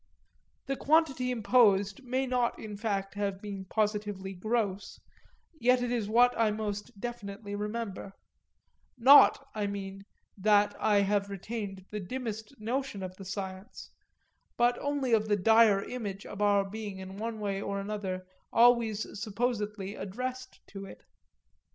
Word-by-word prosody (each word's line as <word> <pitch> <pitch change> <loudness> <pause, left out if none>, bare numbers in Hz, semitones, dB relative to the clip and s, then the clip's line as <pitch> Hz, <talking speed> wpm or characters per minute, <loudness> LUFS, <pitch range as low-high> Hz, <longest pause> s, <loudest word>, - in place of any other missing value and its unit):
The 275 - -1
quantity 275 -4 +2
imposed 215 -3 +3
may 260 +2 -1
not 250 -2 0
in 210 -1 -7
fact 200 -2 -2
have 200 -2 -2
been 200 -2 -6
positively 205 -2 -2
gross, 205 0 -2 0.6
yet 250 0 +3
it 245 - -1
is 225 -4 -1
what 245 +2 +5
I 225 -1 +3
most 210 -1 -4
definitely 205 -3 -6
remember 210 -1 -4 0.8
not, 275 +2 +7
I 210 -2 -1
mean, 195 -1 -5 0.3
that 205 0 +3
I 205 -2 +3
have 200 0 +1
retained 200 -1 -6
the 210 - -3
dimmest 220 +3 -6
notion 235 -2 -3
of 185 0 -6
the 195 - -9
science, 190 0 -7 0.7
but 240 +1 +4
only 285 -4 -1
of 215 -1 +3
the 205 -1 +2
dire 220 0 +5
image 205 -6 -5
of 205 - -7
our 200 -1 +3
being 205 -1 -6
in 190 +1 -8
one 225 +1 -4
way 200 -2 -2
or 200 0 -3
another 195 -2 -4 0.3
always 230 -3 +4 0.2
supposedly 210 -2 -2
addressed 255 +7 -6
to 195 -1 -8
it. - - -12
210 Hz, 140 wpm, -30 LUFS, 200-235 Hz, 0.8 s, not